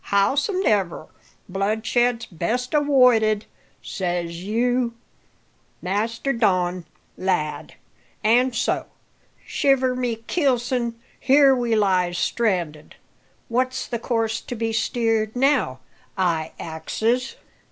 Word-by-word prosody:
Howsomedever, 205 - +1 0.4
bloodshed's 220 +5 0
best 225 +7 -3
awoided, 250 -8 +4 0.4
says 175 -2 -3
you, 235 +3 0 0.8
Master 225 +8 -1
Don, 185 -6 +1 0.3
lad; 180 -5 -2 0.5
an' 245 +4 +4
so, 230 - -1 0.6
shiver 260 -2 +2
my 245 -2 -1
keelson! 245 -6 0 0.2
here 275 0 +5
we 240 -2 0
lies 185 -4 +2
stranded. 175 -10 -1 0.5
What's 255 +2 -1
the 235 - -4
course 225 -1 -1
to 245 - -6
be 225 0 -2
steered 225 -1 0
now, 250 - +1 0.4
I 165 -4 0
axes? 220 +11 -2
225 Hz, 90 wpm, -23 LUFS, 190-250 Hz, 0.8 s, here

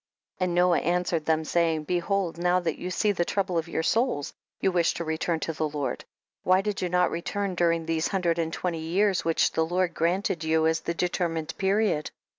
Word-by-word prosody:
22. - - 0
And 175 - -2
Noah 180 0 +4
answered 175 -2 0
them, 160 0 +1
saying, 165 -2 +1
behold 175 +1 -1
now 180 +1 +3
that 170 -3 -3
you 180 - -4
see 205 +3 +1
the 175 -3 0
trouble 185 -1 0
of 165 - -5
your 165 - -2
souls, 225 - 0 0.3
you 190 - +2
wish 175 -2 +2
to 170 - -3
return 160 +1 -1
to 165 - -2
the 155 0 -1
Lord; 145 -2 -3 0.4
why 185 +1 +3
did 205 -1 -3
you 180 - -1
not 180 0 +2
return 195 +3 -2
during 170 -2 +1
these 165 0 0
hundred 175 -3 0
and 165 -1 -1
twenty 170 -1 -2
years, 185 +4 +1
which 165 -1 +2
the 160 - +1
Lord 175 +1 0
gran 175 +5 +1
ted 170 -5 -2
you 160 0 +2
as 160 0 +2
the 170 - -3
determined 170 -3 -1
period 195 -5 +1
170 Hz, 215 wpm, -26 LUFS, 160-185 Hz, 0.4 s, Noah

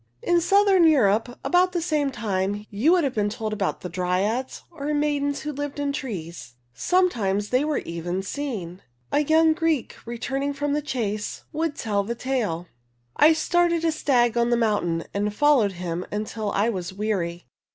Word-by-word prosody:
In 345 0 +3
southern 395 0 +4
Europe 245 -5 +3
about 360 +1 +3
the 350 - 0
same 305 -4 0
time, 205 -3 -2
you 225 +11 +2
would 355 -2 +4
have 270 -3 0
been 205 -1 0
told 220 0 -4
about 200 -3 -2
the - - -5
Dryads, 185 +8 -1
or 300 -2 -3
maidens 290 -1 0
who 300 - -4
lived 290 0 -5
in 285 -1 -1
trees. 170 - -6 0.2
Sometimes 210 - +1
they 255 +3 +2
were 300 -1 0
even 175 +3 -4
seen. 200 -8 -5 0.3
A - - +3
young 315 +2 +4
Greek 320 -5 -1
returning 270 +4 -2
from 290 0 -2
the 300 - 0
chase 215 -7 -3
would 315 -1 -1
tell 205 -6 0
the 235 +4 -4
tale: 230 -10 -2 0.3
" 120 0 -44
I 320 - +6
started 340 0 +1
a 325 - +3
stag 245 -7 +2
on 235 0 +2
the 240 - +3
mountain 205 -8 0
and 205 +1 0
followed 270 -9 +4
him 175 0 -4
until 210 0 -3
I 205 +3 +1
was 185 -6 -3
weary. 185 -5 -2
235 Hz, 175 wpm, -24 LUFS, 200-295 Hz, 0.3 s, I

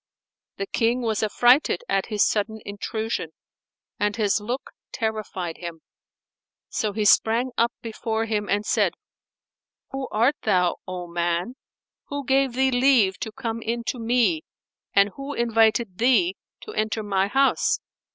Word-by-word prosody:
The 195 - -2
King 235 +4 0
was 220 -3 0
affrighted 240 - +3
at 195 0 0
his 210 -3 +2
sudden 220 +1 -1
intrusion 220 -2 -3 0.7
and 205 0 +1
his 210 -2 +1
look 245 +6 -4 0.2
terrified 210 -6 -3
him; 170 -2 -7 0.9
so 215 - -1
he 210 +1 -1
sprang 230 +4 +4
up 235 +1 +2
before 225 0 -2
him 210 -2 -2
and 205 +1 +1
said, - - +1 1.0
"Who 270 -1 -4
art 240 +7 +2
thou, 180 -4 +2
O 180 -1 -5
man? 175 +5 -1 0.5
Who 285 -1 -4
gave 270 -1 +2
thee 265 +1 +2
leave 245 -7 +3
to 220 - -4
come 230 -1 -4
in 235 +1 -2
to 250 - -3
me 245 +8 +2 0.5
and 200 0 +5
who 275 +1 -5
invited 225 -3 +2
thee 265 +10 +3 0.3
to 430 - -8
enter 215 0 -1
my 195 -1 +1
house?" 270 +6 +2
225 Hz, 140 wpm, -24 LUFS, 205-245 Hz, 1.0 s, and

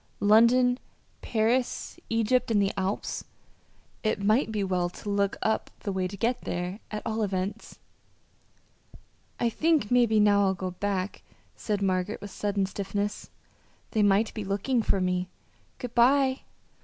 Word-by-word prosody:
London, 240 +4 +5 0.4
Paris, 235 +3 0
Egypt, 230 +3 +1
and 220 -2 +3
the 200 0 +2
Alps 195 +1 -2 0.8
it 215 - 0
might 215 +4 +2
be 210 -2 -1
well 180 -2 0
to 205 +3 -7
look 200 -1 +1
up 220 - 0
the 200 - -3
way 190 -1 -1
to 200 +2 -8
get 235 +5 0
there, 180 +3 -4
at 210 0 -5
all 225 0 -1
events. 200 +2 -3 1.6
"I 235 - +2
think 310 -6 +1
maybe 235 -3 +4
now 205 -1 +5
I'll 190 -1 +2
go 185 0 -4
back," 195 +1 -3 0.3
said 205 -2 -2
Margaret, 185 +2 0
with 205 - -8
sudden 200 -1 -1
stiffness. 200 +1 -3 0.6
"They 220 - +1
might 205 +2 +3
be 215 - -4
looking 205 +6 0
for 200 -2 +1
me. 180 0 -1 0.5
Good 245 -2 -6
bye." 260 +2 +4
205 Hz, 145 wpm, -27 LUFS, 195-230 Hz, 1.6 s, London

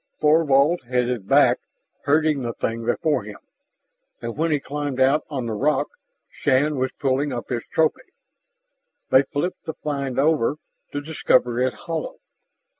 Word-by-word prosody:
Thorvald 150 +1 +4
headed 125 -4 -1
back, - - +5 0.5
herding 155 0 +2
the 120 -2 -3
thing 115 0 -3
before 150 +1 +1
him. 105 0 -9 0.8
And 115 -1 -5
when 165 +2 0
he 150 -2 +2
climbed 145 -1 -4
out 135 +3 +3
on 135 -5 -3
the 115 - -3
rock, 145 +8 +1 0.4
Shann 145 +1 +1
was 130 0 +1
pulling 140 +1 0
up 120 -2 -5
his 120 -2 -1
trophy. 160 -1 0 1.0
They 130 - +7
flipped 145 +6 -4
the 160 - -5
find 140 -3 -3
over, 145 -2 +2 0.4
to 145 - -3
discover 130 -5 +1
it 130 0 +1
hollow. 165 -2 -3
140 Hz, 145 wpm, -23 LUFS, 125-150 Hz, 1.0 s, They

